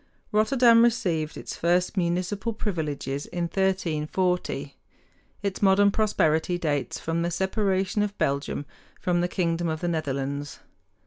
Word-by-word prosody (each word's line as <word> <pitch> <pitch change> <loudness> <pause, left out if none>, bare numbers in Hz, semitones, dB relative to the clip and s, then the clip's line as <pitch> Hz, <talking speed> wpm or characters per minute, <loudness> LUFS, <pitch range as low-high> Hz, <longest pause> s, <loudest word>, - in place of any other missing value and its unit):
Rotterdam 230 +1 +5
received 170 -10 0
its - - -6
first 175 +3 +1
municipal 185 +5 -1
privileges 150 -9 -3
in 175 - -3
1340. 180 -1 -1 0.7
Its 200 -1 -2
modern 200 +1 +5
prosperity 175 -5 +1
dates 150 -5 -2
from 165 +1 -2
the 170 - 0
separation 190 +2 0
of 205 -1 -2
Belgium 140 +1 -1 0.3
from 175 -1 +1
the 175 - +1
kingdom 170 -2 -1
of 160 0 -3
the 175 - -1
Netherlands. 140 -3 -2
175 Hz, 125 wpm, -26 LUFS, 160-195 Hz, 0.7 s, Rotterdam